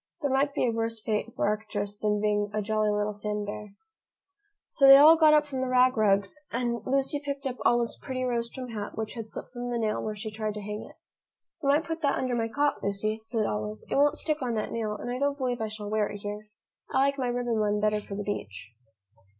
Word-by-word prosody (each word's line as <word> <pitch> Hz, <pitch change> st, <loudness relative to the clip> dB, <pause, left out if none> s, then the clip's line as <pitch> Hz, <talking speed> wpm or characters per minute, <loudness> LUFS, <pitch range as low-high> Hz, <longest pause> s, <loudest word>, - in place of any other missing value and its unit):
There 285 Hz, -3 st, 0 dB
might 280 Hz, +2 st, +1 dB
be -, -, +2 dB
a 240 Hz, -, +2 dB
worse 225 Hz, 0 st, -2 dB
fate 215 Hz, +1 st, -2 dB
for -, -, 0 dB
Arcturus 205 Hz, -1 st, -2 dB
than 210 Hz, -1 st, +1 dB
being 205 Hz, 0 st, +1 dB
a 215 Hz, -, +1 dB
jolly 215 Hz, 0 st, +1 dB
little 210 Hz, 0 st, 0 dB
sand 210 Hz, 0 st, -3 dB
bear. 205 Hz, 0 st, -7 dB, 0.9 s
So 275 Hz, -, +4 dB
they 270 Hz, 0 st, +11 dB
all 305 Hz, +3 st, +9 dB
got 310 Hz, -2 st, +6 dB
up 300 Hz, 0 st, +4 dB
from 270 Hz, -3 st, -4 dB
the 260 Hz, -, -1 dB
rag 255 Hz, +1 st, +4 dB
rugs 205 Hz, +5 st, +2 dB
and 235 Hz, -1 st, -1 dB
Lucy 275 Hz, +2 st, +1 dB
picked 280 Hz, -1 st, -4 dB
up 255 Hz, -2 st, -2 dB
Olive's 240 Hz, -1 st, +2 dB
pretty 255 Hz, -2 st, -4 dB
rose 235 Hz, -2 st, -1 dB
trimmed 255 Hz, -1 st, -7 dB
hat 205 Hz, -2 st, -6 dB
which 220 Hz, -1 st, -3 dB
had 225 Hz, -2 st, -6 dB
slipped -, -, -7 dB
from 245 Hz, -1 st, -5 dB
the 240 Hz, -, -1 dB
nail 215 Hz, -2 st, -1 dB
where 215 Hz, -1 st, -3 dB
she 215 Hz, +1 st, -6 dB
tried 215 Hz, -1 st, -3 dB
to 210 Hz, -, -5 dB
hang 210 Hz, +1 st, -5 dB
it. -, -, -17 dB, 0.7 s
"You 275 Hz, -, 0 dB
might 290 Hz, +3 st, +4 dB
put 325 Hz, 0 st, -5 dB
that 280 Hz, -3 st, +1 dB
under 255 Hz, -1 st, -1 dB
my 230 Hz, -1 st, 0 dB
cot, 285 Hz, +5 st, 0 dB
Lucy," 210 Hz, +2 st, -1 dB
said 220 Hz, -1 st, -1 dB
Olive. 105 Hz, 0 st, -3 dB
"It -, -, +1 dB
won't 290 Hz, +2 st, +4 dB
stick 305 Hz, -1 st, -1 dB
on 245 Hz, -3 st, -1 dB
that 215 Hz, -, -2 dB
nail, 220 Hz, -2 st, -2 dB
and 245 Hz, -, -5 dB
I 250 Hz, -, -3 dB
don't 285 Hz, 0 st, 0 dB
believe 250 Hz, -3 st, -2 dB
I 220 Hz, -, -1 dB
shall 215 Hz, -1 st, -7 dB
wear 215 Hz, -1 st, +1 dB
it 205 Hz, -, -6 dB
here. 210 Hz, +1 st, -6 dB, 0.4 s
I -, -, -1 dB
like 275 Hz, +1 st, +2 dB
my 255 Hz, -, 0 dB
ribbon 240 Hz, -2 st, -1 dB
one 210 Hz, 0 st, +1 dB
better 210 Hz, 0 st, +1 dB
for 200 Hz, -, -8 dB
the 205 Hz, -, -3 dB
beach." 105 Hz, -, -5 dB
225 Hz, 245 wpm, -28 LUFS, 210-260 Hz, 0.9 s, they